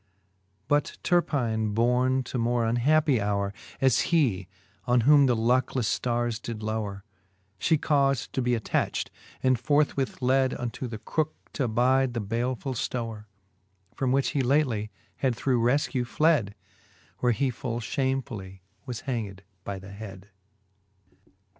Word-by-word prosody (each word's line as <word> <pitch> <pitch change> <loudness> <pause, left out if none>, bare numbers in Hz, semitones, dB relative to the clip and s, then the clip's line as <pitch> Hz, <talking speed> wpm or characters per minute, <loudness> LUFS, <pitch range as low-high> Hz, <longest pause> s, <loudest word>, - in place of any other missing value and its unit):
But 145 0 +1
Terpine 115 -11 +1
borne 125 +3 +2
to 125 - -5
a - - -1
more 120 0 +1
unhappy 135 +4 +3
howre, 100 -1 -1 0.3
As 130 -3 +4
he, 120 - +2 0.4
on 125 -1 +3
whom 140 +2 +6
the 125 - +3
lucklefTe 120 0 +1
ftarres 120 -2 -1
did 115 -2 -6
lowre, 105 -2 -3 0.6
She 160 - +3
caufd 140 -4 +1
to 130 - -1
be 125 0 +2
attacht, 110 - -1 0.3
and 130 -2 +3
forthwith 145 0 +1
led 130 0 +2
Unto 120 +1 -4
the 115 -2 -6
crooke, 155 +7 -2 0.2
t'abide 125 +1 +2
the - - 0
balefull 120 +5 -2
ftowre, 115 -3 -4 0.7
From 130 -2 -1
which 135 +1 +2
he 140 - 0
lately 125 -5 +1 0.3
had 130 -3 +1
through 125 0 +1
reflcew 125 0 +1
fled: 145 -8 +2 0.6
Where 125 - +3
he 130 +3 +1
full 120 -1 -4
fhamefully 120 -6 -3 0.3
was 125 -3 -4
hanged 105 -7 -4 0.2
by 100 0 -4
the 95 +1 -11
hed. 100 -1 -10
125 Hz, 135 wpm, -27 LUFS, 110-135 Hz, 0.7 s, whom